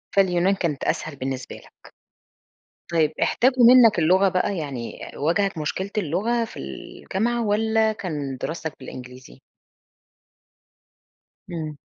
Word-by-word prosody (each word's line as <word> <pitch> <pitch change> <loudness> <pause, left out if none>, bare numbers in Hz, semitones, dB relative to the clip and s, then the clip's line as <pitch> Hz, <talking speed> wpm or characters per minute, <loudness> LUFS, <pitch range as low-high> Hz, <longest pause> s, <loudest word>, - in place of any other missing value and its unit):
فاليونان 190 0 +3
كانت 165 -7 -2
أسهل 155 -2 -2
بالنسبة 130 -1 -5
لك، - - -17 1.0
طيب 155 -2 +2
احتاجوا 255 0 +3
منك 235 -4 +7
اللغة 185 +4 +4
بقى، 185 +2 0
يعني 140 -7 -5 0.2
واجهك 175 +4 0
مشكلة 190 +6 -3
اللغة 210 +7 0
في - - -11
الجامعة، 215 - -3
والَّا 220 +1 +2
كان 150 -10 -4
دراستك 160 -1 -4
بالإنجليزي؟ 130 0 -11 2.1
إمم. 155 -4 -5
175 Hz, 105 wpm, -23 LUFS, 150-210 Hz, 2.1 s, منك